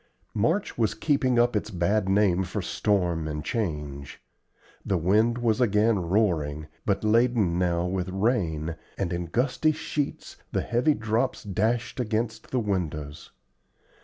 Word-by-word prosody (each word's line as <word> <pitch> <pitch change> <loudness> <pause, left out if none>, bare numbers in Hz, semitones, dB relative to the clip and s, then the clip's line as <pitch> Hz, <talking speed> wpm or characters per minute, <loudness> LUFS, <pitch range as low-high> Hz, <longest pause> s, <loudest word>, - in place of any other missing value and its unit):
March 160 - 0
was 110 -4 +1
keeping 130 -1 +1
up 120 0 +3
its 105 +1 -1
bad 95 +1 0
name 95 -2 +3
for 95 +3 -4
storm 90 -4 0
and 75 -1 -4
change. 75 - -3 0.6
The 95 - 0
wind 105 +8 +3
was 120 -1 +1
again 105 -1 +3
roaring, 85 -6 0 0.2
but - - +1
laden 110 -5 +3
now 85 -1 +1
with 90 0 -2
rain, 90 -6 0 0.2
and 95 -3 -1
in 85 0 -3
gusty 125 - +1
sheets 150 -2 -4
the - - 0
heavy 125 +6 +2
drops 110 +4 -1
dashed 110 +5 -1
against 110 -1 -2
the 130 - 0
windows. 80 -9 -3
105 Hz, 135 wpm, -26 LUFS, 85-115 Hz, 0.6 s, up